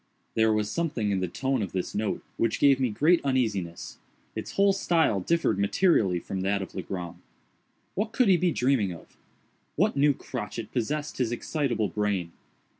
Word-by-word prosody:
There 110 0 +3
was 105 -1 +1
something 140 -11 -1
in 95 - +1
the 90 - -1
tone 130 +7 -1
of 100 - -4
this 95 -1 -3
note 105 0 -2
which 115 - 0
gave 140 -2 +5
me 130 -2 +1
great 155 +11 +3
uneasiness. 110 -11 -2 0.4
Its - - -5
whole 200 0 +4
style 165 - +2
differed 165 - +1
materially 100 - +3
from 95 +2 -5
that 100 +1 0
of - - -10
Legrand. 90 -2 -6 0.7
What 215 +3 -2
could 235 +1 +2
he 190 - +6
be 175 0 +2
dreaming 125 - +1
of? 85 - -14 0.6
What - - +2
new 140 0 +4
crotchet 115 -3 -6
possessed 145 +5 -2
his 120 -3 +1
excitable 120 -4 -1
brain? 100 -5 -1
115 Hz, 170 wpm, -27 LUFS, 100-150 Hz, 0.7 s, he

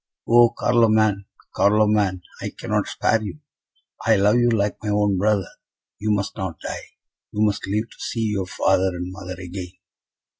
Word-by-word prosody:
"Oh, 120 0 +6
Carloman! 110 -4 +3 0.3
Carloman! 105 -3 +2 0.2
I - - -3
cannot - - -1
spare 115 - +1
you. 110 +6 -6 0.7
I 115 - +4
love 105 +3 +4
you 120 0 +3
like 105 -3 0
my 105 - -3
own 105 -1 +2
brother. 100 -2 +1 0.5
You 105 +2 -2
must 100 -1 0
not 95 -6 -5
die - - -7 0.4
you 105 - 0
must 105 -2 -1
live 105 +3 -1
to - - -18
see 115 -2 -2
your 95 -3 -2
father 95 0 +1
and 90 +1 -5
mother 90 0 -8
again!" 90 0 -7
105 Hz, 160 wpm, -22 LUFS, 95-110 Hz, 0.7 s, Oh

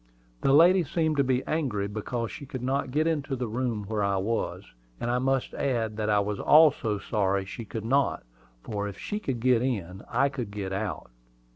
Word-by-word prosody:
The 135 - +3
lady 175 +5 +6
seemed 160 0 0
to 140 - +4
be 130 -1 +1
angry 125 -11 -1
because 110 +3 -3
she 140 - -9
could 130 -3 -6
not 135 +1 0
get 150 +4 +1
into 150 -4 -1
the 125 -1 -3
room 115 -1 -2
where 105 0 -2
I 100 -1 +1
was; 110 +4 -2 0.4
and 120 - -1
I 125 - +1
must 135 0 0
add 115 -6 -1
that 110 -1 -1
I 105 -1 +4
was 100 0 -2
also 150 -9 +5
sorry 100 -2 0
she 110 +4 -7
could 110 +1 -6
not, 135 +4 +1 0.4
for 105 -1 -3
if 100 -1 -7
she 210 - -4
could 135 - -3
get 125 -1 +3
in, 100 -7 -2
I 140 - +3
could 125 -6 -5
get 100 -2 -4
out. 95 - -4
120 Hz, 200 wpm, -27 LUFS, 105-135 Hz, 0.4 s, lady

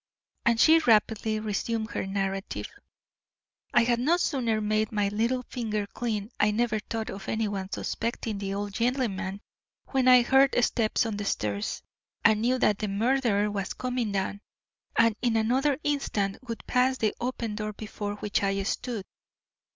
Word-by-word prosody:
And 235 -1 +3
she 320 +5 +7
rapidly 220 -3 +2
resumed 220 +1 -2
her - - -3
narrative. 195 0 -2 1.1
"I 240 -4 +5
had 235 0 +2
no 310 +8 +3
sooner 245 -10 0
made 215 0 0
my 205 -2 +1
little 230 +5 0
finger 215 -5 -3
clean 215 0 -3
I 210 - +4
never 220 0 +1
thought 220 +1 -4
of 195 -2 -7
anyone 205 -3 -2
suspecting 225 -2 -3
the 195 -1 -3
old 205 0 -4
gentleman 210 -5 -1 0.5
when 265 -2 +1
I 250 -1 +8
heard 265 +2 +4
steps 225 0 +1
on 220 -2 -3
the 205 - -4
stairs 105 - -2 0.4
and 215 -1 +5
knew 250 +3 +2
that 210 -5 +2
the 215 - -1
murderer 210 0 +1
was 200 -2 -3
coming 250 -4 -2
down, 200 +1 -2 0.6
and 230 -2 +4
in 235 -2 +2
another 260 +5 +2
instant 245 -9 -1
would 230 -1 -6
pass 255 +1 +2
the 215 -3 +1
open 240 -3 -2
door 215 0 -3
before 205 -1 -5
which 205 0 -1
I 195 0 0
stood. 220 0 -3
220 Hz, 160 wpm, -27 LUFS, 205-245 Hz, 1.1 s, I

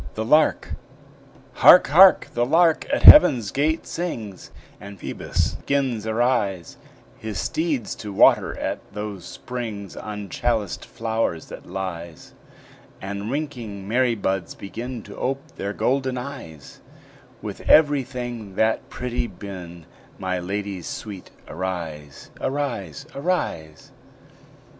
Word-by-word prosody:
THE 110 - -2
LARK 150 +6 +3 0.8
Hark! - - +7
hark! 185 +6 +7
the 120 - +1
lark 165 +5 +3
at 285 - 0
heaven's 125 - +9
gate 155 +4 0
sings, 115 - -5 0.3
And 100 0 -10
Phoebus - - -2
'gins 130 -6 0
arise, 110 -6 0 0.4
His 110 -2 -5
steeds 155 -9 -2
to 105 - -7
water 95 - +4
at - - -3
those 105 -4 -6
springs 110 -3 -6
On 105 -1 -6
chaliced 110 -1 -2
flowers 110 -7 -3
that - - -10
lies; 85 -4 -6 0.7
And 100 +2 -5
winking 120 -9 -5
Mary 120 +2 +2
buds 95 -4 -2
begin 115 +3 -7
To 100 - -11
ope 135 +2 -2
their 100 - -4
golden 130 +3 0
eyes; 120 - -9 0.6
With - - -6
every 145 -3 +6
thing 120 -6 -7
that 110 +2 0
pretty 125 -1 -3
bin, 90 -4 -9 0.3
My 95 -1 -2
lady 100 +1 -4
sweet, 100 +2 -7 0.2
arise; 80 -5 -6
Arise, 135 -2 -3
arise. 140 - -3
110 Hz, 115 wpm, -23 LUFS, 95-130 Hz, 0.8 s, heaven's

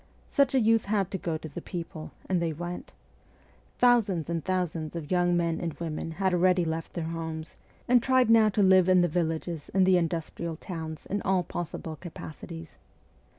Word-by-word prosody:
Such 275 -1 +2
a - - +5
youth 225 -1 +3
had 200 -2 0
to 190 - -3
go 165 -2 -2
to 160 - -8
the 150 - -7
people 165 -3 -6 0.2
and 180 -2 +1
they 165 -2 0
went. 175 +3 -6 0.9
Thousands 210 -10 +3
and 165 -2 -2
thousands 170 -4 -2
of 160 -1 -6
young 175 -1 +3
men 170 -1 0
and 170 -3 -3
women 165 -1 -4
had 190 +2 0
already 180 0 +3
left 160 0 -3
their 170 - -3
homes, 160 -1 -5 0.3
and 245 0 +5
tried 260 0 +3
now 220 -1 +6
to 205 0 +2
live 185 -1 +5
in 185 -1 +6
the 175 - +3
villages 165 -1 -2
and 190 -1 +5
the 185 -1 +5
industrial 165 0 -2
towns 160 -2 -7
in 205 +1 -2
all 190 -2 +1
possible 165 -2 -5
capacities. 165 -1 -9
175 Hz, 185 wpm, -28 LUFS, 165-190 Hz, 0.9 s, now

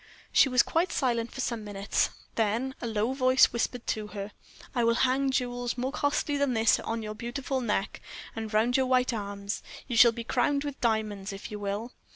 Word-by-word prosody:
She 270 - +5
was 250 -1 +5
quite 340 +3 0
silent 235 -3 0
for 265 - -5
some 235 -4 -2
minutes, 200 -1 0 0.2
then 230 +4 0
a 235 - -3
low 220 +3 0
voice 255 -1 +4
whispered 240 +1 -2
to 215 -1 -2
her: 205 0 -6 0.4
"I 245 -3 +1
will 230 0 +3
hang 270 +2 +1
jewels 245 -2 -1
more 255 +2 -1
costly 290 0 0
than 280 -3 +1
this 225 0 +4
on 225 0 -3
your 215 0 -4
beautiful 260 +4 -3
neck, 210 -4 -2 0.3
and 220 -1 -5
round 225 +4 +3
your 260 -1 +2
white 255 -1 +2
arms; 200 -1 -4 0.3
you 245 - -3
shall 235 0 +8
be 230 0 -6
crowned 280 +4 +1
with 285 -2 -6
diamonds, 215 -4 0
if 195 +3 -8
you 210 - -5
will. 205 +4 -4
235 Hz, 195 wpm, -28 LUFS, 215-260 Hz, 0.4 s, shall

